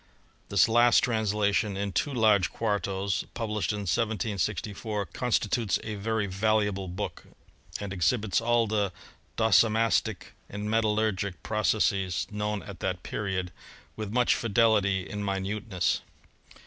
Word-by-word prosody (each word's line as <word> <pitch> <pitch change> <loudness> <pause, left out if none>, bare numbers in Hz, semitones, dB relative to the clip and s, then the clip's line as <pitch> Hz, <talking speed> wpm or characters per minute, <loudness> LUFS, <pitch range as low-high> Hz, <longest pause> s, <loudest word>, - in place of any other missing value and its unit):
This 100 - +4
last 120 +1 +5
translation, 105 -3 +1
in 100 0 -2
two 145 - 0
large 110 -6 +3
quartos, 100 -4 -1
published 110 -3 -1
in 105 0 -3
1764, 105 0 -2
constitutes 115 +1 0
a 110 - -4
very 110 +1 -1
valuable 100 0 0
book, 95 +4 -5 0.5
and 100 -1 -5
exhibits 100 +3 +1
all 120 0 +3
the 105 -3 0 0.5
docimastic 110 0 +2 0.2
and 105 +1 -5
metallurgic 105 -3 0
pro 110 0 -2
cesses 100 -4 +1
known 105 0 -2
at 100 -4 -9
that 90 -2 -3
period 95 -3 -3 0.4
with 105 -2 -5
much 125 +1 +3
fidelity 105 -5 +2
and 105 +5 -5
mi 100 -1 0
nuteness. 100 -1 -1
105 Hz, 120 wpm, -28 LUFS, 100-110 Hz, 0.5 s, last